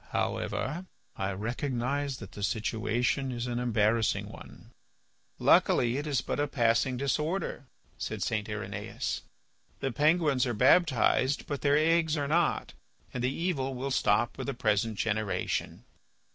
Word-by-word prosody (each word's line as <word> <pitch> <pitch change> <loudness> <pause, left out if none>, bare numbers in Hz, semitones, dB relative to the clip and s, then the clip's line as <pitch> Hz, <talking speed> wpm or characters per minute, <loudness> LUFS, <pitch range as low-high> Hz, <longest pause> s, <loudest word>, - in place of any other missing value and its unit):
However, 170 +7 -2 0.3
I 95 0 -2
recognise 130 +5 -2
that 100 - -10
the 105 - -9
situation 115 +5 0
is 120 -1 -3
an 120 -1 -2
embarrassing 110 -2 +1
one." - - -13 0.7
"Luckily 120 +1 +4
it 145 +2 -3
is 140 -5 +1
but - - -3
a 145 - +1
passing 120 0 +2
disorder," 150 +3 -2 0.3
said - - -3
St. 110 -1 -2
Irenaeus. 105 0 -4 0.6
"The 135 - -1
penguins 150 -1 +2
are 120 - -1
baptized, 130 - +3
but 145 -2 -4
their 145 0 +4
eggs 160 0 +3
are 145 -1 -1
not, 165 +2 +1 0.4
and 125 - -3
the 125 - +2
evil 140 -5 -2
will 135 +2 -3
stop 115 -2 +1
with - - -4
the 140 - -2
present 110 -2 +1
generation." 105 -4 -2
130 Hz, 140 wpm, -29 LUFS, 115-145 Hz, 0.7 s, Luckily